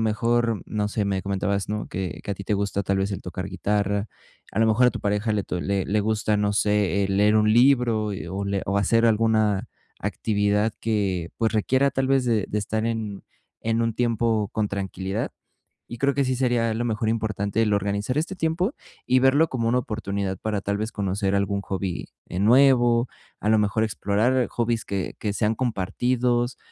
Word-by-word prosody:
mejor, 115 0 +1
no 105 -1 -1
sé, 105 -1 -1
me 95 -1 -1
comentabas, 100 +1 -1
¿no?, 105 0 -3
que 95 -1 -4
que - - -5
a - - -4
ti 100 - -9
te 105 - -1
gusta 100 0 -1
tal 100 0 0
vez 95 +1 0
el - - -5
tocar 90 +1 -5
guitarra, 100 +2 -1 0.4
a - - -3
lo 110 - +4
mejor 115 +3 +4
a - - +1
tu - - -6
pareja 105 +2 0
le 105 -2 0
to 90 - -3
le 100 0 -1
le 105 +1 +1
gusta, 105 0 0
no 105 0 +1
sé, 105 -1 +2
eh, - - -2
leer 105 +2 +3
un 110 0 +4
libro 120 -4 +3
y 95 - -6
o 95 +3 -4
le 100 0 -1
o 100 - 0
hacer 115 +3 +3
alguna 110 -2 +2 0.3
actividad 105 0 0
que, 95 -6 -1
pues 110 -2 +1
requiera, 130 +6 +2
tal 135 -1 -1
vez, 135 -2 +3
de 110 -4 +2
de 105 - -1
estar 110 +2 -2
en 110 -3 -3 0.4
en 115 +1 0
un 115 -1 0
tiempo 115 -3 +1
con 105 -2 0
tranquilidad. 95 -1 -3 0.6
Y 120 - -5
creo 140 +3 +2
que 140 - +1
sí 130 -1 0
sería 120 -2 +1
a - - -1
lo 120 +2 -1
mejor 110 -1 -1
importante 110 -1 0
el 105 -2 +1
organizar 100 +5 -1
este 170 +5 -3
tiempo 180 - -1 0.3
y 130 - +4
verlo 135 +5 +4
como 115 -3 -1
una 125 +2 +2
oportunidad 100 -5 -3
para, 105 -2 -2
tal 100 +1 -1
vez, 110 +2 -3
conocer 100 0 -1
algún 100 0 0
hobby, 95 -3 -4 0.2
eh, 90 - -6
nuevo, 120 +1 +5 0.3
a 105 - -1
lo 110 - +5
mejor 105 +1 +1
explorar 110 +4 +1
hobbies 115 -1 -1
que 100 -2 -3
que 105 -2 -2
sean 110 +1 0
compartidos, 120 +2 0
105 Hz, 200 wpm, -24 LUFS, 100-115 Hz, 0.6 s, nuevo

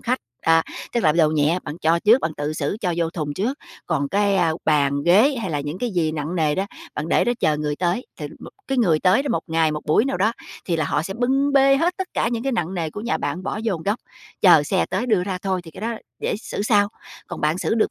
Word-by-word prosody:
khách, 255 +2 0 0.2
à, 165 0 +4 0.3
tức 240 - +1
là 155 - +5
đồ 160 -2 +4
nhẹ 155 +3 +2
bạn 150 +3 -6
cho 165 0 +2
trước, 220 +7 +5
bạn 160 - -2
tự 145 +1 -2
xử 155 +4 -2
cho 180 -3 0
vô 165 -1 0
thùng 150 -4 -4
trước, 240 - -2 0.3
còn 145 -4 0
cái, 200 +3 +2
a, 170 -3 +2
bàn 140 -2 +2
ghế 215 - +4
hay 190 - -3
là 145 -2 -1
những 145 +5 -5
cái 245 - -2
gì 165 -5 0
nặng 155 +2 -4
nề 155 -2 +2
đó, 195 +1 -1 0.3
bạn 150 +2 -4
để - - +3
đó 240 - +2
chờ 150 -1 +2
người 150 -1 -2
tới, 180 - -1
thì - - -5
m - - -11 0.2
cái 270 -1 0
người 165 -9 +3
tới 190 +8 +4
đó 285 - -4
một 165 - -1
ngày, 160 -1 +1
một 150 - -3
buổi 155 +10 +3
nào 270 - -1
đó 210 +5 +2 0.3
thì 170 - 0
là 160 - 0
họ - - 0
sẽ 195 +4 -5
bưng 270 +4 +1
bê 275 0 +5
hết 340 +5 +1
tất 380 -1 -4
cả - - +1
những 235 -1 -2
cái 270 - -1
nặng 185 -5 -2
nề 165 -3 -2
của 205 - -7
nhà 235 +4 -1
bạn 165 +6 -3
bỏ 215 - -3
vô 220 -5 +1
một 160 - -6
góc, 205 +5 -1 0.4
chờ - - +7
xe - - 0
tới 250 - -2
đưa 210 -6 +2
ra 190 -2 -3
thôi 190 -2 -1
thì 165 - -10
cái 160 - -11
đó 230 +2 -2 0.2
để - - -1
xử 205 - -5
sau. 205 -2 +3 0.4
Còn - - -6
bạn 155 +3 +1
xử 205 - 0
được 220 - +2
180 Hz, 280 wpm, -22 LUFS, 155-225 Hz, 0.4 s, chờ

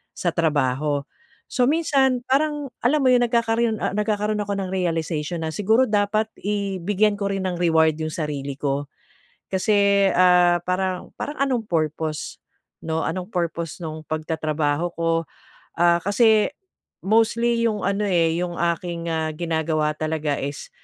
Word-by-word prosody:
sa 175 - 0
trabaho. 145 -2 +1 0.5
So, 250 -2 +2
minsan 270 -5 +2
parang 290 0 0
alam 290 +5 +3
mo 260 - +5
yung 245 -1 +4
nagkakaroon 230 -1 +1
ah, - - 0
nagkakaroon 210 0 0
ako 200 0 -3
ng 190 -2 -3
realization 165 -2 -2
na 160 - -2
siguro 220 +5 +3
dapat 210 +1 +1 0.2
i 200 -2 -2
bigyan 205 +2 +2
ko 200 - -1
rin 195 -1 -2
ng 180 - -2
reward 160 -2 +3
yung 155 - -2
sarili 140 -3 -4
ko. 140 0 -1 0.6
Kasi, 200 0 +3
ah, 180 -1 +5
parang 185 0 -2
parang 290 - -4
anong 255 -5 0
purpose, 155 -2 -2 0.5
'no? 160 0 -1
Anong 180 +2 -3
purpose 170 -3 -3
nung 155 0 -6
pagtatrabaho 155 0 -1
ko? 165 0 0 0.7
Ah, 170 0 +4
kasi 215 +1 +3 0.6
mostly 230 +2 +2
yung 210 -2 -4
ano, 200 +1 0
eh, 170 -4 +2
yung 175 -1 -3
aking, 170 0 -2
ah, 160 -1 -1
ginagawa 160 -2 -1
talaga, 155 -1 -2
is 140 +1 -5
180 Hz, 145 wpm, -23 LUFS, 160-215 Hz, 0.7 s, mo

